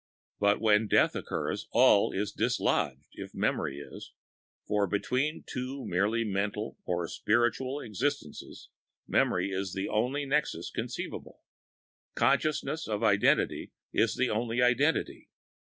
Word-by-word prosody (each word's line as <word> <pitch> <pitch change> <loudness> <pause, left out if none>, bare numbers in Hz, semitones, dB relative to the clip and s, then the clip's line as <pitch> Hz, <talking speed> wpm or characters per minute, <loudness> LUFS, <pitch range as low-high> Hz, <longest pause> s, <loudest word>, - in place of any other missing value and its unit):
But 100 0 +3
when 110 0 +3
death - - +3
occurs 105 +2 -3
all 120 -4 +5
is 100 +1 -2
dislodged - - 0
if - - -9
memory 70 - -1
is; 70 - -10 0.5
for 105 -1 +1
between 130 - -1
two 130 +2 -5
merely 105 +6 +1
mental 105 +1 -2
or 85 -1 -1
spiritual 120 - 0
existences 125 - -4 0.4
memory 90 +2 +1
is 95 -1 -3
the 95 - -2
only 125 +7 0
nexus 140 - -1
conceivable; - - -6 0.7
consciousness 155 +3 +1
of 105 0 -2
identity 100 -2 +2 0.2
is 115 - +2
the 130 - +1
only 115 +2 -1
identity. 125 +6 +1
110 Hz, 120 wpm, -29 LUFS, 100-130 Hz, 0.7 s, all